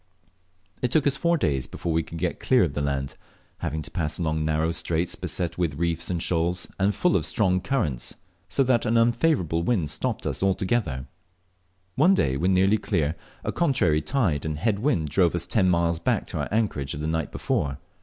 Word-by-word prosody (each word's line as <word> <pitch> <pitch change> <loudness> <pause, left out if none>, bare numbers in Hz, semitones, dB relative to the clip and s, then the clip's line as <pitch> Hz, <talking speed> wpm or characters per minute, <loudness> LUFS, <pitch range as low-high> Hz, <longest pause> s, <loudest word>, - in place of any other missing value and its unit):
It 125 - +1
took 150 +3 +2
us 140 -1 +3
four 170 +3 +2
days 70 - 0
before 85 - -4
we 80 - +2
could 85 - -8
get - - -2
clear 130 -6 +3
of 80 -6 -1
the 75 - -2
land, 70 -1 -2 0.5
having 80 +1 -3
to - - -12
pass 75 -3 -2
along 80 -2 -1
narrow 80 +1 +1
straits 85 +1 -1
beset 85 -1 -2
with 85 -5 0
reefs 85 +1 -1
and 85 -2 0
shoals, 85 +1 0
and 100 +2 +2
full 180 - +2
of 80 - +2
strong 90 +4 +1
currents, 85 - -1 0.3
so 135 - +2
that 120 -2 +2
an 115 +1 +3
unfavourable 115 - +2
wind 85 -7 0
stopped - - -2
us - - -2
altogether. 95 - 0 0.9
One 175 - +4
day, 65 - +1
when 85 +7 +1
nearly 95 +3 +3
clear, 80 -7 0 0.3
a - - -1
contrary 125 - +2
tide 100 - 0
and 75 -1 -3
head 100 +4 0
wind 100 - +1
drove 90 +2 +2
us 85 -1 0
ten 95 +2 +2
miles 85 -1 +1
back - - 0
to - - -4
our - - -2
anchorage 95 -12 -1
of - - -6
the 75 - -3
night 80 -1 -1
before. 70 -1 -1
85 Hz, 200 wpm, -25 LUFS, 75-110 Hz, 0.9 s, One